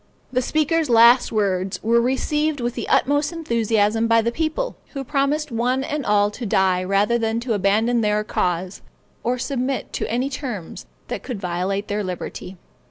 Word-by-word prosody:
The 255 - +2
speaker's 310 +2 +1
last 235 +2 +6
words 195 -3 0
were 235 +2 +3
received 295 +4 0
with 240 0 -2
the - - -5
utmost 290 +3 +2
enthusiasm 225 -7 +1
by 230 0 +4
the 235 - 0
people, 320 - -2 0.2
who 275 -2 -4
promised 285 +2 0
one 250 +3 0
and 290 -1 -3
all 205 0 +3
to 245 - -8
die 190 -3 +2
rather 200 +5 +2
than 225 0 0
abandon 220 +3 +2
their 210 0 +1
cause, 180 -2 -2 0.4
or 245 +2 0
submit 260 0 -3
to - - -3
any 250 +4 -1
terms 245 - -6 0.2
that - - -4
could 245 -6 -5
violate 185 +2 -2
their 205 0 -2
liberty. 185 0 -6
235 Hz, 165 wpm, -22 LUFS, 205-270 Hz, 0.4 s, last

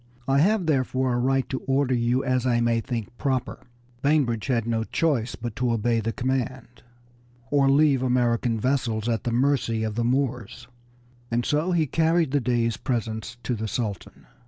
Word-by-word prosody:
I 135 +1 +3
have, 195 +4 +3
therefore, 130 -3 +1
a 120 - 0
right 135 +1 +1
to 130 - -2
order 135 -1 +2
you 120 +2 +1
as 130 -1 0
I 120 -1 +2
may 115 -1 +2
think 115 -3 -5
proper." 130 -3 -1 0.4
Bainbridge 135 -7 +1
had 120 -4 +1
no 115 -1 0
choice 125 -3 0
but 120 -2 -6
to 125 -1 +1
obey 115 +1 +1
the 115 +1 -2
command, 130 0 -3 0.7
or 140 -1 +4
leave 140 -1 +4
American 125 -2 +1
merchant 110 - -3
vessels 120 -5 0
at 115 -2 -1
the 120 - 0
mercy 120 -3 +1
of 110 -1 -2
the 115 +2 -1
Moors, 125 -3 -2 0.6
and 120 +1 0
so 155 +5 +1
he 170 -3 +2
carried 165 +1 +1
the 145 - +2
Dey's 115 -2 0
presents 115 -2 -3
to 125 - -1
the 110 -1 -3
Sultan. 105 -4 -5
125 Hz, 180 wpm, -25 LUFS, 115-135 Hz, 0.7 s, or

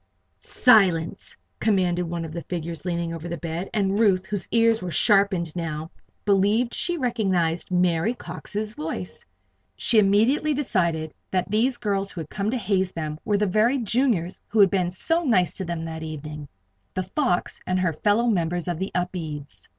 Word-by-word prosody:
"Silence!" 185 -9 +3 0.2
commanded 185 -5 +2
one 170 -1 -3
of 160 - -7
the 170 +1 -5
figures 170 0 -5
leaning 170 -2 -2
over 165 +1 -6
the 170 - -3
bed, 165 +3 -4
and 200 -1 0
Ruth, 190 -4 +3
whose 205 -1 -4
ears 230 -1 +3
were 180 - -4
sharpened 190 -3 +2
now, 160 -2 -4 0.3
believed 205 +4 +3
that - - -5
she 350 -1 -1
recognized 190 - 0
Mary 180 +4 +2
Cox's 210 +3 -5
voice. 95 - -6 0.5
She 225 - +3
immediately 230 +10 +3
decided 170 - 0 0.2
that 185 +1 -1
these 240 +4 +2
girls 200 -3 -1
who 175 - -5
had 155 - -10
come 200 +1 -1
to 255 - 0
haze 190 -4 0
them 155 -2 -4
were 205 - +2
the 210 - +2
very 215 +7 +2
Juniors 225 -7 0
who 220 - -4
had 195 -2 +7
been 185 -3 +1
so 325 - 0
nice 195 - +2
to 190 - -3
them 170 -1 -4
that 160 -1 -6
evening 150 -1 -7 0.5
"The 185 - 0
Fox" 185 0 -1
and 185 0 +1
her 180 -3 +1
fellow 210 +8 +2
members 175 -6 0
of 175 -2 -2
the 190 - -3
Upedes. 155 - -4
185 Hz, 175 wpm, -24 LUFS, 165-215 Hz, 0.5 s, had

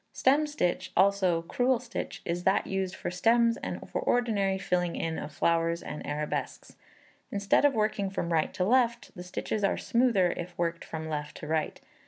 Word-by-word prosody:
Stem 290 +4 +3
stitch, 290 -12 -1
also 190 -4 +3
Crewel 245 +8 +1
stitch, 240 -1 -6
is 175 +1 -2
that 190 +2 +2
used 190 -1 -2
for - - -4
stems 230 +5 +3
and - - -6
for - - -3
ordinary 210 -6 +1
filling 180 -2 -1
in 165 -1 -2
of 150 - -6
flowers 165 +3 +1
and 150 - -6
arabesques. 150 +1 -4 0.6
Instead 200 +7 +2
of 285 - +4
working 215 -2 0
from 170 -3 -2
right 160 -1 +1
to 185 - 0
left, 235 +1 +2
the 180 - -7
stitches 190 +3 -3
are 195 - +2
smoother 230 -7 +2
if 175 0 -7
worked 170 -1 -1
from 160 0 -6
left 150 -1 -4
to - - -8
right. 155 0 -1
190 Hz, 180 wpm, -29 LUFS, 170-230 Hz, 0.6 s, of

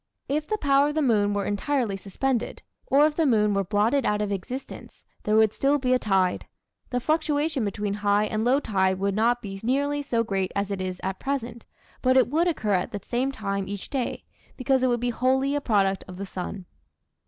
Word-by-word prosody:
If 300 +2 -1
the 430 - -1
power 280 -5 +3
of 295 - -3
the 310 - +1
moon 210 -5 +2
were 200 - -1
entirely 225 +1 -1
suspended, 230 +6 -2 0.2
or 285 +2 +5
if 305 -1 0
the 320 -2 +2
moon 210 -4 +3
were 195 0 +1
blotted 215 +8 +1
out 210 -1 +1
of 210 -1 -1
existence, 245 +8 -7 0.2
there 210 - +2
would 220 -1 +4
still 280 +2 +2
be 255 -2 +1
a 255 - +3
tide. 190 -4 +1 0.4
The 250 - -1
fluctuation 305 -1 0
between 205 0 -2
high 205 0 +2
and 215 0 -2
low 255 +4 +3
tide 190 -7 +1
would 200 +1 0
not 240 +4 +1
be 195 -1 -6
nearly 285 +4 0
so 240 -5 0
great 195 -4 -2
as 200 0 -1
it 195 -1 -3
is 185 -1 -4
at 190 0 -3
present, 240 -4 -4 0.3
but 255 0 +3
it 255 - +4
would 330 +4 +2
occur 220 -11 0
at 180 -1 0
the 205 - -5
same 255 +3 -1
time 200 -5 -3
each 200 -1 -6
day, 265 -3 -2 0.3
because 265 0 +1
it 255 - +3
would 240 -1 +1
be 245 0 0
wholly 265 +3 +1
a 290 - 0
product 195 -6 +1
of 180 -1 -9
the 200 - -4
sun. 185 0 -6
230 Hz, 215 wpm, -25 LUFS, 200-275 Hz, 0.4 s, or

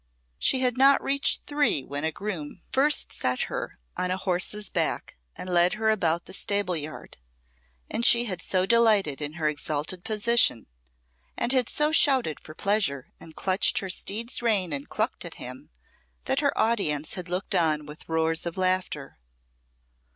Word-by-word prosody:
She 260 - +2
had 250 -1 +1
not 275 +1 +6
reached 280 +1 +2
three 290 - +1
when 145 +1 -5
a 160 - 0
groom 180 -3 -6
first 290 +2 +2
set 125 0 -1
her - - -4 0.2
on 180 - -2
a 185 - -1
horse's 190 +3 -1
back - - -2 0.2
and - - -8
led 175 0 +3
her 220 0 +1
about 170 -5 0
the - - -10
stable 200 -2 +1
yard, 155 0 -7 0.7
and 235 - -3
she 235 0 +6
had 185 -6 -4
so 185 -1 0
delighted 210 -10 +3
in 150 0 -3
her 160 -2 -2
exalted 150 +4 -2
position, 215 - +2 0.7
and 245 - +1
had 255 -3 +1
so 300 +1 +1
shouted 265 - +4
for 155 - -12
pleasure 195 -11 -1
and 160 - -12
clutched 190 +5 +1
her 195 -6 -1
steed's 230 +7 -1
rein 200 -8 +1
and 140 0 -5
clucked - - -2
at - - -8
him, - - -8 0.6
that - - +1
her - - 0
audience 155 -10 0
had 180 -2 -6
looked 180 +3 -2
on 155 -4 +1
with 150 +2 -12
roars 160 +1 0
of 170 - -6
laughter. 185 - -1
185 Hz, 165 wpm, -26 LUFS, 155-225 Hz, 0.7 s, not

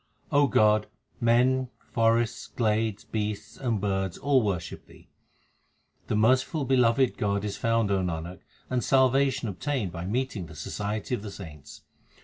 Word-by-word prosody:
God, 110 -7 +4 0.3
men, 125 +2 +3
forests, 115 0 0
glades, 110 -2 0
beasts, 105 -1 -4
and 120 -5 -1
birds 95 -2 -1
all 140 -2 +3
worship 90 -7 -3
Thee. - - -18 1.0
The - - 0
merciful 130 +7 +2
beloved 125 0 +3
God 100 0 0
is 100 -1 -3
found, 115 -2 +1
O 100 - +2
Nanak, 85 0 -4 0.3
and 125 -2 -1
salva 135 +1 +4
tion 130 -2 -4
obtained 100 - -2
by 85 0 -6
meeting 110 -3 -2
the 80 - -12
society 105 - -4
of 120 - -1
the 105 - -6
saints. 80 -8 -11
110 Hz, 140 wpm, -27 LUFS, 100-125 Hz, 1.0 s, God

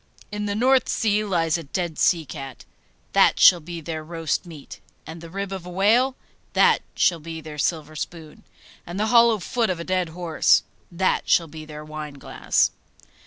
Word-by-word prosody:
In 210 0 -3
the 200 - -2
North 255 +3 +3
Sea 215 -1 +1
lies 170 -5 0
a - - -7
dead 170 +2 -4
sea 165 -3 +2
cat 135 -2 -9 0.5
that - - +4
shall 175 - +8
be 170 +1 -8
their 160 0 -5
roast 165 +1 -3
meat; 155 -4 -11 0.3
and 160 +1 -9
the 165 - -10
rib 195 +2 -5
of 190 -2 -5
a 180 - -9
whale 225 +8 +2 0.4
that - - +4
shall 170 -2 +2
be 165 +1 -7
their 155 -1 -9
silver 155 0 -2
spoon; 155 0 -8 0.4
and 175 +3 -5
the 215 - +1
hollow 235 -2 +6
foot 230 +3 -1
of 180 -2 -2
a - - -4
dead 185 -1 -1
horse 170 -1 +2 0.3
that 185 +2 0
shall 170 - +4
be 155 0 -10
their 150 0 -9
wineglass. 150 -2 -1
170 Hz, 180 wpm, -23 LUFS, 155-195 Hz, 0.5 s, shall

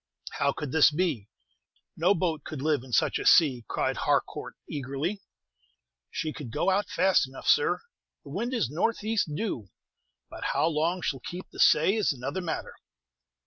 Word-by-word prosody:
"How 140 - +3
could 145 -1 -5
this 160 0 +6
be? 150 - -1 0.7
No 180 +5 +3
boat 160 -4 -1
could 155 - -6
live 150 -2 +1
in 130 - -13
such - - +2
a - - -5
sea," 130 -9 +5
cried - - -1
Harcourt, - - -1
eagerly. 145 +8 -3 0.9
"She 155 -1 -3
could 145 -6 -7
go 175 +11 +1
out 195 0 0
fast 190 -7 +3
enough, 135 - -10
sir. 470 -1 +3 0.4
The 140 - -11
wind 225 - -2
is 245 - 0
northeast, 210 - 0
due; 155 - -3 0.6
but - - -9
how - - +3
long 165 +2 0
she'll 135 - -1
keep 175 +8 -8
the - - -12
say 160 +6 +5
is 215 -5 +2
another 135 +8 -4
matter." 170 -3 -4
160 Hz, 165 wpm, -28 LUFS, 140-190 Hz, 0.9 s, this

